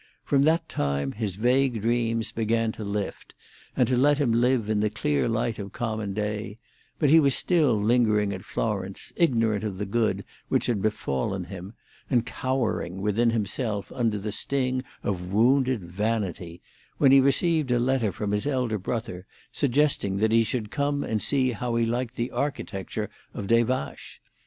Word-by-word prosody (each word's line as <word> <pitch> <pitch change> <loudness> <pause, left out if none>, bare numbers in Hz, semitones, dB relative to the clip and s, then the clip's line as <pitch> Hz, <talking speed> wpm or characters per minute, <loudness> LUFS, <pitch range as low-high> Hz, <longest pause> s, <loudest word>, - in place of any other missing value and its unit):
From 140 -1 +2
that 160 +2 +2
time 70 -1 -1
his 105 -4 -3
vague 125 +1 +2
dreams 115 -1 0
began 115 0 0
to 110 - -8
lift, 100 -1 -4 0.4
and - - +4
to 130 - +1
let 145 +3 +4
him 140 -5 +1
live 120 -1 +2
in 110 -1 +1
the 105 0 +1
clear 75 -4 0
light 115 0 -1
of 100 -1 -7
common 110 -4 -3
day; 105 0 -3 0.4
but 145 -2 +2
he 165 - +8
was 140 -4 +4
still 150 - +3
lingering 105 -2 +2
at 95 - -6
Florence, 100 -3 -3
ignorant 115 - +2
of 100 -3 -3
the 105 - -3
good 110 +3 0 0.2
which - - +1
had 115 -5 0
befallen 95 -3 -1
him, 95 +3 -9 0.3
and 120 -3 +2
cowering 120 -10 -2
within 105 +4 +2
himself 110 -1 -2
under 115 -4 0
the 105 +1 -4
sting 130 +2 -1 0.2
of 90 -2 -3
wounded 125 +1 +3
vanity, 90 -2 -3 0.3
when 135 -2 +5
he 135 - +8
received 145 +2 +2
a 120 - +3
letter 120 -3 +1
from 105 0 -3
his 105 +5 0
elder 125 -6 0
brother 100 -2 -4 0.2
suggesting 140 -8 +1
that 110 +2 +2
he 115 0 +5
should 110 -1 -3
come 145 +2 0
and 110 -2 -2
see 130 -3 +1
how 120 +1 -3
he 115 0 +2
liked 120 +1 -2
the 120 +2 -2
architecture 105 - -3 0.3
of 100 - -4
Des 115 +3 +4
Vaches. 125 - -4
115 Hz, 170 wpm, -26 LUFS, 105-130 Hz, 0.4 s, he